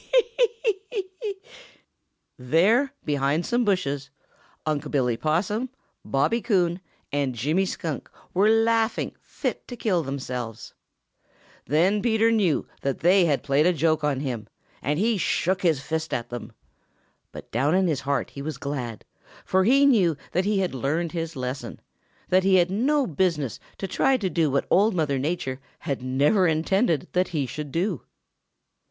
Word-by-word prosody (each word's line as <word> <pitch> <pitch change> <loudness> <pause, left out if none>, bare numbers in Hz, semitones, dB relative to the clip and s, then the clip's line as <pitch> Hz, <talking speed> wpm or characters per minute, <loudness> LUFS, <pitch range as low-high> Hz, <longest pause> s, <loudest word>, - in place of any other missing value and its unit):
Ho, - - -25
ho, - - +7 0.2
hoi 485 - +6 0.2
Hee, 420 -4 0 0.2
hee, 375 - -24
hee!" 410 -4 -4 1.0
There, 190 - +3
behind 145 +3 +1
some 240 0 +1
bushes, 145 - 0 0.6
Unc' 150 -2 -1
Billy 125 -5 +1
Possum, 185 - 0 0.3
Bobby 230 +13 +1
Coon, 180 -6 +1 0.3
and 140 -3 -1
Jimmy 155 - +1
Skunk 160 -7 -4 0.2
were 200 +4 +4
laughing 225 0 +2
fit - - -4
to 245 - -7
kill 190 -7 +1
themselves. 125 -6 -5 0.9
Then 180 - +3
Peter 225 0 +3
knew 195 -9 +1
that 135 -1 -2
they 180 +3 +5
had 145 -4 +1
played 145 +3 +3
a 180 - +4
joke 155 -1 +1
on 140 -2 0
him, 120 -7 -4 0.3
and 145 +2 0
he 215 +2 +1
shook 185 +1 0
his 160 -6 +2
fist 160 +1 -2
at 120 - -4
them. 120 - -6 0.8
But - - -11
down 140 +8 +2
in 190 0 +3
his 150 -6 0
heart 140 0 -1
he 140 - -8
was 150 -1 -4
glad, 130 -6 -5 0.4
for 190 0 +2
he 275 +5 +5
knew 190 - +4
that 185 +2 +1
he 210 0 +1
had 185 - -1
learned 150 +6 -1
his 165 -2 -4
lesson 130 +1 -5 0.5
that 185 +1 +4
he 190 0 +4
had 180 0 +4
no 270 +8 +2
business 155 - -1 0.2
to 195 - -4
try 265 +8 +2
to 195 -6 -2
do 160 -1 +2
what 140 0 0
Old 205 +2 +4
Mother 145 -5 0
Nature 140 -3 -2 0.2
had 140 -3 -4
never 145 +10 +3
intended 165 +2 +1
that 180 +1 +2
he 155 -6 -1
should 145 +3 -6
do. 175 - -1
165 Hz, 165 wpm, -25 LUFS, 140-200 Hz, 1.0 s, ho